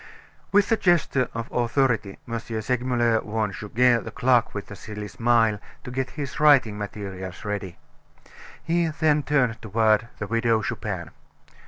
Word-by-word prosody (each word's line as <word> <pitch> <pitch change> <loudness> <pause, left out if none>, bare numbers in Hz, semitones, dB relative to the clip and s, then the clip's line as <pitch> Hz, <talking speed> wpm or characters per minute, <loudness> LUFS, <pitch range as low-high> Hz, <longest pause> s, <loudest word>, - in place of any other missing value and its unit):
With 205 +2 +3
a 225 - +4
gesture 170 -9 +2
of 115 0 -3
authority 120 -4 0
M. 115 -1 -2
Segmuller 120 0 0
warned 105 -1 -2
Goguet, 115 +3 +2
the - - -6
clerk 125 -2 +2
with 100 - -4
the 105 - -10
silly 105 0 -7
smile, 115 -1 +2 0.2
to 125 - -7
get 130 +1 -2
his 140 -3 -4
writing 140 -8 +5
materials 100 -3 -6
ready. 100 -4 -4 0.9
He 170 +1 +1
then 155 -1 +2
turned 125 -6 +1
toward 110 +1 +2
the 105 - -4
Widow 115 0 +1
Chupin. - - -4
115 Hz, 145 wpm, -25 LUFS, 105-130 Hz, 0.9 s, writing